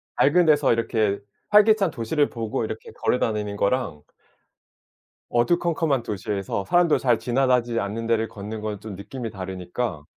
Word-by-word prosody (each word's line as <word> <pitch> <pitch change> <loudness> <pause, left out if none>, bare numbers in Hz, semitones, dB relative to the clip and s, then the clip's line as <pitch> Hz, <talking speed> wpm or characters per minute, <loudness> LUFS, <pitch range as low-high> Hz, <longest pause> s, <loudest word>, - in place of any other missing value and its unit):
밝은 175 +5 +4
데서 145 -5 +4
이렇게 110 -3 0 0.3
활기찬 210 -3 +5
도시를 145 +5 0
보고 115 -1 -3
이렇게 110 0 -7
걸어다니는 105 -4 -1
거랑 100 - 0 1.3
어두컴컴한 155 +1 +1
도시에서 100 -1 -3
사람들 175 - +3
잘 120 -3 +3
지나가지 125 -2 +1
않는 110 +3 -4
데를 115 -1 +1
걷는 105 +2 -7
건 105 -1 -3
좀 105 -1 -8
느낌이 110 +5 -6
다르니까 95 -2 -4
115 Hz, 335 characters per minute, -24 LUFS, 105-135 Hz, 1.3 s, 활기찬